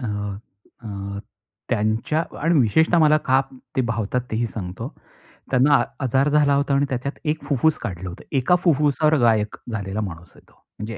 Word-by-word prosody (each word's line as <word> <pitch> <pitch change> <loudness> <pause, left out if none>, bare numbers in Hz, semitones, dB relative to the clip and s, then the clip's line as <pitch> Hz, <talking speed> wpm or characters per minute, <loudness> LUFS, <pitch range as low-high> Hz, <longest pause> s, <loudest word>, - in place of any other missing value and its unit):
अ, 125 - -4 0.8
अ, 100 -2 -6 0.5
त्यांच्यांत 115 +8 -1
आणि 165 +1 +2
विशेषतः 160 +9 +3
मला 155 -1 +5
ते - - -19 0.6
का 120 - -1
भावतात, 115 +2 -1
तेही 115 +2 0
सांगतो. 95 -4 -6 0.6
त्यांना 135 +3 +5
अ - - +1 0.2
आजार 135 +3 +2
झाला 145 -1 +3
होता 140 0 +1
आणि 140 +1 +3
त्याच्यात 130 +2 -2
1 155 +1 -1
फुफ्फूस 145 +3 +2
काढलं 90 -1 -5
होतं, 85 - -10
1का 135 +8 +3
फुफ्फुसावर 150 -1 +3
गायक 110 -3 +2 0.2
झालेला 100 -1 -3
माणूस 85 -4 -7
आहे - - -17
तो. - - -25 0.3
म्हणजे 105 -1 -5
125 Hz, 165 wpm, -22 LUFS, 105-150 Hz, 0.8 s, मला